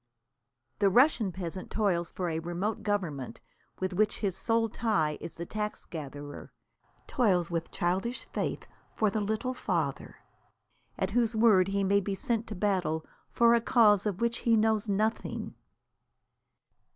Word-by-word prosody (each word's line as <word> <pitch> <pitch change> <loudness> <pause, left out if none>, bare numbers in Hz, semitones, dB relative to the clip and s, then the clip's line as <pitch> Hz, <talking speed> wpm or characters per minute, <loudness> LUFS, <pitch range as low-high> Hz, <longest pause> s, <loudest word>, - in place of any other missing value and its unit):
The 200 -1 +4
Russian 235 -2 +4
peasant 185 0 -6
toils 180 -6 0
for 180 - -3
a 160 -1 -1
remote 175 +6 -3
government, 160 - -2 0.4
with 185 0 -2
which 215 +3 +1
his 195 -4 -1
sole 225 +3 +1
tie 205 -9 0
is - - -7
the 170 - -5
tax 210 +3 -4
gatherer; 145 -2 -8 0.5
toils 185 -9 +1
with 165 -1 -2
childish 190 +8 -1
faith - - -2 0.3
for 215 -2 +2
The 215 - -1
Little 220 +5 -1
Father, 165 - -2 0.8
at 190 0 -1
whose 230 0 +1
word 215 -5 +5
he 200 0 0
may 200 +1 +3
be 200 0 -3
sent 230 +3 -1
to 215 - -5
battle 180 -5 0 0.2
for 235 0 +4
a 235 - +4
cause 215 -4 +4
of 200 -1 -3
which 235 0 +1
he 230 -1 +3
knows 220 0 +1
nothing. 215 +3 -1
200 Hz, 150 wpm, -29 LUFS, 175-220 Hz, 0.8 s, word